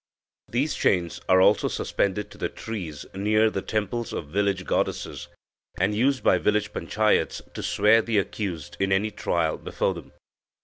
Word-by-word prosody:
These 140 Hz, +6 st, 0 dB
chains 85 Hz, -3 st, 0 dB
are 95 Hz, 0 st, +6 dB
also 95 Hz, -, +4 dB
suspended 100 Hz, +1 st, -1 dB
to 105 Hz, -, -14 dB
the -, -, -1 dB
trees 90 Hz, -10 st, -6 dB
near 110 Hz, +3 st, +2 dB
the 95 Hz, -, -2 dB
temples 110 Hz, +3 st, -2 dB
of 75 Hz, -, -5 dB
village 100 Hz, +1 st, 0 dB
goddesses, -, -, -2 dB, 0.5 s
and 95 Hz, +3 st, +2 dB
used 130 Hz, +5 st, +1 dB
by -, -, +4 dB
village 105 Hz, 0 st, +1 dB
panchayats 110 Hz, 0 st, +1 dB
to -, -, -5 dB
swear 105 Hz, +3 st, +4 dB
the 110 Hz, -1 st, -1 dB
accused 95 Hz, -6 st, -3 dB
in 95 Hz, 0 st, +1 dB
any 100 Hz, +3 st, +2 dB
trial -, -, 0 dB
before -, -, -1 dB
them." -, -, -11 dB
105 Hz, 160 wpm, -25 LUFS, 95-110 Hz, 0.5 s, are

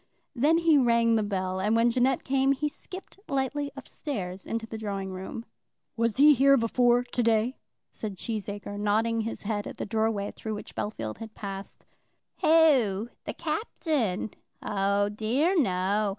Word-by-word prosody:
Then 295 Hz, +5 st, +3 dB
he 330 Hz, -3 st, +4 dB
rang 235 Hz, -2 st, +3 dB
the 225 Hz, -, +3 dB
bell, 190 Hz, -2 st, -2 dB
and 210 Hz, +4 st, +1 dB
when 230 Hz, +1 st, +4 dB
Jeannette 255 Hz, +2 st, +2 dB
came 270 Hz, +1 st, +2 dB
he 300 Hz, +2 st, -1 dB
skipped 370 Hz, +6 st, -10 dB
lightly 280 Hz, +1 st, -1 dB
up 275 Hz, -, -9 dB
stairs 190 Hz, -10 st, -5 dB
into 230 Hz, 0 st, -2 dB
the 225 Hz, -, -8 dB
drawing 195 Hz, -3 st, -4 dB
room. 190 Hz, +5 st, -6 dB, 0.5 s
"Was 230 Hz, 0 st, 0 dB
he 295 Hz, +2 st, +8 dB
here 275 Hz, +1 st, +5 dB
before 240 Hz, +1 st, +3 dB
to 245 Hz, 0 st, -2 dB
day?" 230 Hz, +2 st, +1 dB, 0.3 s
said 210 Hz, -3 st, -6 dB
Cheesacre, 205 Hz, -1 st, -5 dB
nodding 220 Hz, +2 st, +1 dB
his 225 Hz, +1 st, -5 dB
head 205 Hz, 0 st, -2 dB
at -, -, -8 dB
the -, -, -3 dB
doorway 220 Hz, -1 st, 0 dB
through 220 Hz, -1 st, -5 dB
which 210 Hz, -, -9 dB
Bellfield 115 Hz, -, -4 dB
had 225 Hz, -1 st, -9 dB
passed. 195 Hz, -1 st, -7 dB, 0.5 s
"Who? 260 Hz, -10 st, +4 dB, 0.2 s
The -, -, -4 dB
Captain? 300 Hz, -, -1 dB, 0.3 s
Oh 200 Hz, 0 st, +1 dB
dear 235 Hz, -, +1 dB
no. 200 Hz, -, +1 dB
225 Hz, 160 wpm, -27 LUFS, 205-265 Hz, 0.5 s, he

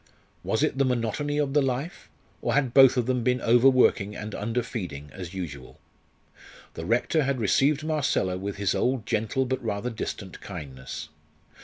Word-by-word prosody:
Was -, -, 0 dB
it 135 Hz, -, 0 dB
the -, -, +5 dB
monotony 130 Hz, +4 st, -1 dB
of 145 Hz, -2 st, 0 dB
the 145 Hz, -, +4 dB
life? 135 Hz, +5 st, -3 dB, 0.3 s
or -, -, 0 dB
had 135 Hz, -4 st, +1 dB
both 135 Hz, -1 st, +7 dB
of 125 Hz, -, +2 dB
them 125 Hz, 0 st, 0 dB
been 125 Hz, +2 st, +1 dB
overworking 120 Hz, -4 st, +4 dB
and 105 Hz, 0 st, -6 dB
underfeeding 105 Hz, -, -4 dB
as 95 Hz, -1 st, -8 dB
usual? 70 Hz, -8 st, -7 dB, 0.9 s
The 80 Hz, -, -6 dB
Rector 125 Hz, +7 st, +2 dB
had 135 Hz, -2 st, 0 dB
received 135 Hz, +7 st, +2 dB
Marcella 145 Hz, -12 st, 0 dB
with 100 Hz, +2 st, -4 dB
his 100 Hz, -1 st, 0 dB
old 125 Hz, -3 st, 0 dB
gentle 110 Hz, +5 st, 0 dB
but 130 Hz, 0 st, -2 dB
rather 110 Hz, +2 st, -2 dB
distant 100 Hz, -4 st, -6 dB
kindness. 75 Hz, -4 st, -7 dB
120 Hz, 160 wpm, -26 LUFS, 100-135 Hz, 0.9 s, both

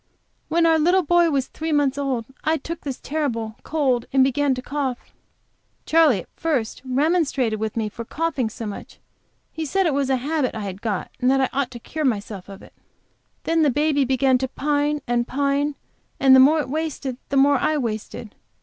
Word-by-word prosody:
"When 335 Hz, 0 st, +2 dB
our 325 Hz, -1 st, +4 dB
little 355 Hz, +4 st, +3 dB
boy 345 Hz, +1 st, +4 dB
was 275 Hz, -4 st, 0 dB
three 320 Hz, +4 st, -5 dB
months 290 Hz, -3 st, +2 dB
old 270 Hz, -5 st, -2 dB, 0.2 s
I 315 Hz, +1 st, +2 dB
took 335 Hz, +1 st, -7 dB
this 275 Hz, -3 st, -5 dB
terrible 230 Hz, -8 st, -3 dB
cold 265 Hz, -6 st, 0 dB
and 265 Hz, -1 st, +4 dB
began 275 Hz, +1 st, +1 dB
to 255 Hz, -, -5 dB
cough. 270 Hz, -4 st, -4 dB, 0.7 s
Charley 310 Hz, -, +4 dB
at -, -, -17 dB
first 280 Hz, -9 st, -2 dB
remonstrated 270 Hz, -4 st, +1 dB
with 220 Hz, +1 st, -3 dB
me 220 Hz, -1 st, 0 dB
for 230 Hz, +3 st, -7 dB
coughing 280 Hz, -2 st, -2 dB
so 225 Hz, +1 st, -7 dB
much; 205 Hz, -1 st, -8 dB, 0.5 s
he 320 Hz, -, -5 dB
said 385 Hz, +6 st, 0 dB
it 320 Hz, -, +2 dB
was 275 Hz, -1 st, 0 dB
a 265 Hz, -, +3 dB
habit 275 Hz, 0 st, -1 dB
I 220 Hz, -, -4 dB
had 195 Hz, -1 st, -6 dB
got, 210 Hz, -5 st, -3 dB
and 250 Hz, -, +2 dB
that 270 Hz, +1 st, +3 dB
I 265 Hz, -, +2 dB
ought 270 Hz, -2 st, 0 dB
to 245 Hz, -2 st, -9 dB
cure 310 Hz, +6 st, -5 dB
myself 205 Hz, -6 st, -2 dB
of 195 Hz, -1 st, -11 dB
it. -, -, -16 dB, 0.7 s
Then 330 Hz, 0 st, +1 dB
the 300 Hz, -, +4 dB
baby 290 Hz, +1 st, +2 dB
began 260 Hz, 0 st, +2 dB
to 265 Hz, -, -1 dB
pine 290 Hz, +1 st, -1 dB
and 240 Hz, 0 st, 0 dB
pine, 280 Hz, +1 st, 0 dB, 0.4 s
and 265 Hz, -1 st, +7 dB
the -, -, +8 dB
more 295 Hz, +5 st, +6 dB
it -, -, -6 dB
wasted 295 Hz, -4 st, -3 dB
the 280 Hz, -, 0 dB
more 280 Hz, 0 st, +5 dB
I 310 Hz, -, +1 dB
wasted. 220 Hz, -3 st, -4 dB
275 Hz, 200 wpm, -22 LUFS, 245-305 Hz, 0.7 s, the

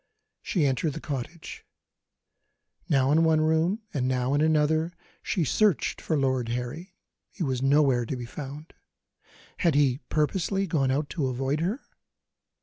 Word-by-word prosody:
She 170 Hz, -6 st, 0 dB
entered 135 Hz, +3 st, 0 dB
the 160 Hz, -, -6 dB
cottage. 150 Hz, +3 st, -6 dB, 1.3 s
Now 135 Hz, -1 st, +3 dB
in 160 Hz, +2 st, +4 dB
one 160 Hz, -1 st, +4 dB
room, 160 Hz, +7 st, +1 dB
and 130 Hz, -3 st, 0 dB
now 130 Hz, +1 st, 0 dB
in 145 Hz, -, +2 dB
another, 155 Hz, +2 st, +2 dB, 0.3 s
she 175 Hz, -, -1 dB
searched 200 Hz, +4 st, +1 dB
for 160 Hz, -, 0 dB
Lord 130 Hz, -3 st, 0 dB
Harry; 125 Hz, +10 st, -5 dB, 0.3 s
he 185 Hz, -, -5 dB
was 130 Hz, -4 st, -1 dB
nowhere 135 Hz, -3 st, +3 dB
to 135 Hz, -, -2 dB
be 125 Hz, -1 st, -6 dB
found. 145 Hz, +5 st, -8 dB, 0.8 s
Had 170 Hz, -5 st, +2 dB
he 140 Hz, -3 st, +3 dB
purposely 190 Hz, +5 st, 0 dB
gone 150 Hz, -7 st, +1 dB
out 145 Hz, +2 st, -1 dB
to 150 Hz, -7 st, -1 dB
avoid 135 Hz, +3 st, -1 dB
her? 195 Hz, -, -1 dB
150 Hz, 145 wpm, -27 LUFS, 130-160 Hz, 1.3 s, in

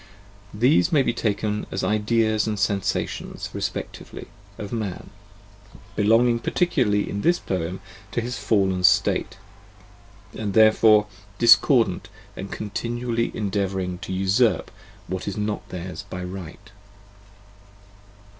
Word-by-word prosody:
These 125 Hz, -, +3 dB
may 145 Hz, -4 st, +4 dB
be 120 Hz, -, 0 dB
taken 105 Hz, -2 st, -2 dB
as 95 Hz, -, -3 dB
the -, -, 0 dB
ideas 110 Hz, 0 st, +1 dB
and 105 Hz, -1 st, -2 dB
sensations, 100 Hz, -1 st, -2 dB
respectively, -, -, -6 dB, 0.3 s
of 105 Hz, -2 st, -7 dB
Man: 105 Hz, -6 st, -4 dB, 0.8 s
belonging 115 Hz, +3 st, +3 dB
particularly 120 Hz, -, +1 dB
in 100 Hz, -, -3 dB
this 175 Hz, +7 st, +3 dB
poem 90 Hz, 0 st, -4 dB, 0.3 s
to -, -, -1 dB
his 120 Hz, +1 st, -4 dB
fallen 95 Hz, -4 st, +1 dB
state, -, -, +3 dB, 1.0 s
and 105 Hz, -3 st, -4 dB
therefore 110 Hz, -1 st, +6 dB, 0.3 s
discordant 115 Hz, -4 st, +4 dB, 0.3 s
and 95 Hz, -, -7 dB
continually 115 Hz, +2 st, -2 dB
endeavouring 95 Hz, -3 st, -2 dB
to -, -, -7 dB
usurp 95 Hz, +6 st, +1 dB, 0.3 s
what 95 Hz, +1 st, -5 dB
is 100 Hz, -, -3 dB
not 105 Hz, 0 st, -3 dB
theirs 90 Hz, -2 st, -6 dB
by 90 Hz, 0 st, -5 dB
right. 90 Hz, +2 st, -9 dB
105 Hz, 115 wpm, -23 LUFS, 95-115 Hz, 1.0 s, therefore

